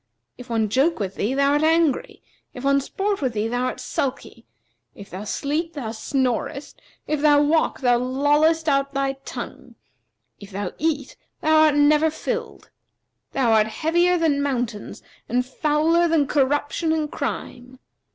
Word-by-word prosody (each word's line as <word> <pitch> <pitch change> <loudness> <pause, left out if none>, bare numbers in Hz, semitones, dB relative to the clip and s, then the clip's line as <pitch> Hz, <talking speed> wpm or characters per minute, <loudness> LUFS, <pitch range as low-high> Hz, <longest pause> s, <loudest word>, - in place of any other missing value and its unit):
If 250 0 -12
one 225 -2 +1
joke 270 +10 +2
with 195 -2 -3
thee, 215 +7 -2
thou 280 0 +3
art 295 +1 +2
angry; 320 -3 +1 0.3
if 250 - -8
one 275 0 +3
sport 395 +7 -2
with 260 -4 -1
thee, 215 0 -1
thou 245 +2 -1
art - - -3
sulky; 270 -1 -4 0.5
if 200 - -12
thou 190 +3 -6
sleep, 305 +9 -2
thou 245 -7 -5
snorest 275 +4 -3 0.2
if 305 -1 -2
thou 295 -1 +5
walk, 315 +1 +1
thou 245 -2 +3
lollest 295 +5 +2
out 275 -1 +1
thy 275 0 0
tongue! - - -8 0.6
if 200 - -11
thou 200 -2 -4
eat, 290 -3 -1 0.3
thou 315 0 +3
art 300 -2 +3
never 300 +2 +4
filled. 465 +9 -5 0.6
Thou 255 -4 +2
art 215 -1 +4
heavier 345 +8 +1
than 310 -4 +1
mountains 245 -6 -3 0.3
and 250 +1 +1
fouler 310 +5 +1
than 320 -3 +2
corruption 290 +3 0
and 310 -2 -2
crime. 255 0 -5
280 Hz, 155 wpm, -23 LUFS, 250-310 Hz, 0.6 s, thou